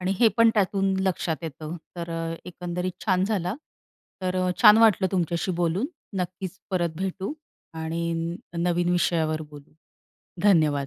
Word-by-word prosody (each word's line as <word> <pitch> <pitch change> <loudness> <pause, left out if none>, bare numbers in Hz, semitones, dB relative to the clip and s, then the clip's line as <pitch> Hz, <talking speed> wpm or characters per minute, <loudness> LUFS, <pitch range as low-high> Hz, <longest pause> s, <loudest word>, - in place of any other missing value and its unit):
आणि 185 +1 0
हे 230 - +6
पण 230 -1 +6
त्यातून 195 -1 +2
लक्षात 170 -3 0
येतं. 155 +2 -6 0.2
तर 170 0 -5 0.4
एकंदरीत 180 0 -4
छान 185 -1 +3
झाल. 195 -5 -1 0.8
तर 185 0 -1 0.3
छान 210 +1 +9
वाटलं 210 -4 +5
तुमच्याशी 175 0 0
बोलून. 175 +7 0 0.3
नक्कीच, 185 0 -4
परत 175 -3 +1
भेटू 190 - -3 0.4
आणि 165 +1 -2 0.2
नवीन 175 0 +1
विषयावर 160 -3 +1
बोलू. 145 -1 -13 0.7
धन्यवाद. 155 -8 +4
175 Hz, 125 wpm, -25 LUFS, 165-190 Hz, 0.8 s, छान